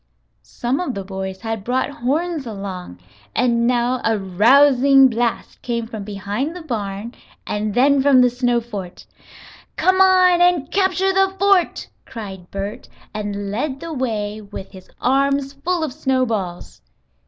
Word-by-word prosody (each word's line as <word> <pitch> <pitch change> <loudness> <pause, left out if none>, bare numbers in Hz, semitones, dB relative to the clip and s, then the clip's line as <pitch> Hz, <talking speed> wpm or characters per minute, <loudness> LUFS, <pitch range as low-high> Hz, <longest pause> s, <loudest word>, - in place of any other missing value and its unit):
Some 245 +3 -3
of 355 -8 -3
the 195 - -4
boys 190 0 -6
had 225 -2 -4
brought 255 +5 -1
horns 290 +3 -2
along, 195 - -7 0.4
and 235 -1 +2
now 245 +1 +1
a 225 -1 +1
rousing 265 +7 +5
blast 235 0 -2
came 235 -2 -2
from 220 -3 -7
behind 205 - -4
the 355 - -8
barn 215 -4 -4 0.3
and 210 0 -3
then 275 +2 +4
from 270 -1 +5
the 250 -1 +4
snow 245 -1 +1
fort. 200 -6 -8 0.7
"Come 375 0 +3
on 365 -2 +5
and 350 -5 +2
capture 385 0 +1
the 385 0 +2
fort!" 390 -3 +2 0.2
cried 195 -7 -8
Bert, 200 +2 -6 0.2
and 205 -1 -4
led 260 +5 -3
the 330 +2 -6
way, 215 -6 -3
with 200 -2 -9
his 185 -1 -14
arms 275 +1 +1
full 330 +4 -2
of 300 -5 -3
snowballs. 230 - -2
245 Hz, 145 wpm, -20 LUFS, 205-280 Hz, 0.7 s, rousing